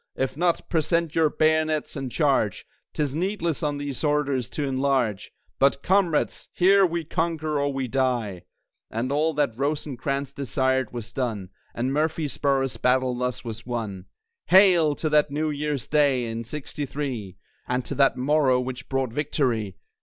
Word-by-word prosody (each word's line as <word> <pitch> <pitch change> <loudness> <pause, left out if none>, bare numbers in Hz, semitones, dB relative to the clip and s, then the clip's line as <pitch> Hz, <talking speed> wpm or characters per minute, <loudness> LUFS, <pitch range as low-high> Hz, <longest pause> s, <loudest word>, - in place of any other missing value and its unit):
If 135 0 -2
not, 170 +2 0
present 165 0 0
your 160 -2 +3
bayonets, 155 0 +1
and 135 -3 -4
Charge! 135 - +1 0.3
'Tis 145 -2 -2
needless 170 -2 -1
on 145 -2 -1
these 145 -1 -4
orders 140 -5 +1
to 150 - -3
enlarge; 130 -6 0 0.3
But 140 0 +3
Comrades! 185 -4 +1
here 195 +1 +5
we 170 0 -3
conquer 155 -2 -1
or 140 0 0
we 135 -1 -2
die!" 120 -8 -1 0.4
And 120 +4 -2
all 155 +2 +1
that 145 -6 +1
Rosecrans 140 0 -2
desired 130 -2 0
was 115 -1 -7
done; 110 -7 -3 0.2
And 125 +3 -1
Murfreesboro's 145 -3 0
battle 130 0 +2
thus 125 +1 -3
was 115 -1 -6
won. 105 -6 -4 0.4
Hail! 180 -6 +6
to 160 - -2
that 150 -1 +3
New 150 +2 -1
Year's 145 -3 -3
Day 140 -5 +2
in 115 0 -4
'Sixty 145 +3 -5
three, 120 -10 -4 0.3
And 125 0 -1
to - - -3
that 135 -2 +3
morrow 135 -1 +3
which 125 0 -5
brought 135 -3 -1
victory. 125 -8 -1
140 Hz, 155 wpm, -25 LUFS, 125-150 Hz, 0.4 s, Hail